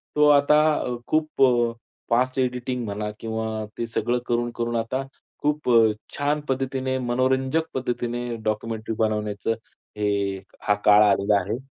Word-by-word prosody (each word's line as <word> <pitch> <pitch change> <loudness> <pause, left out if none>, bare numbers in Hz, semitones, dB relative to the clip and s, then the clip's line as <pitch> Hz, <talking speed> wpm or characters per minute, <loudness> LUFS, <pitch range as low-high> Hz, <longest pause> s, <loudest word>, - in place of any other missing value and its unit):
तो 150 0 +5
आता 145 +1 +5 0.2
अ, 125 - -2
खूप 155 -2 0
अ, 120 -2 +4 0.4
फास्ट 130 +3 +1
एडिटिंग 125 -1 -1
म्हणा 105 0 -3
किंवा 110 -1 -3
ते 115 - -2
सगळं 120 +1 0
करून-करून 120 0 -1
आता 130 +4 -2 0.4
खूप 150 -2 0
अ, 115 -2 +6 0.2
छान 145 +1 0
पद्धतीने, 130 0 -1
मनोरंजक 130 +5 +1
पद्धतीने 120 -1 -2 0.2
डॉक्युमेंटरी 110 +1 -2
बनवण्याचं 105 0 0 0.4
हे, 100 -2 0 0.2
हा 105 - +2
काळ 105 0 +7
आलेला 100 0 +3
आहे. 105 +5 -3
120 Hz, 135 wpm, -24 LUFS, 110-130 Hz, 0.4 s, काळ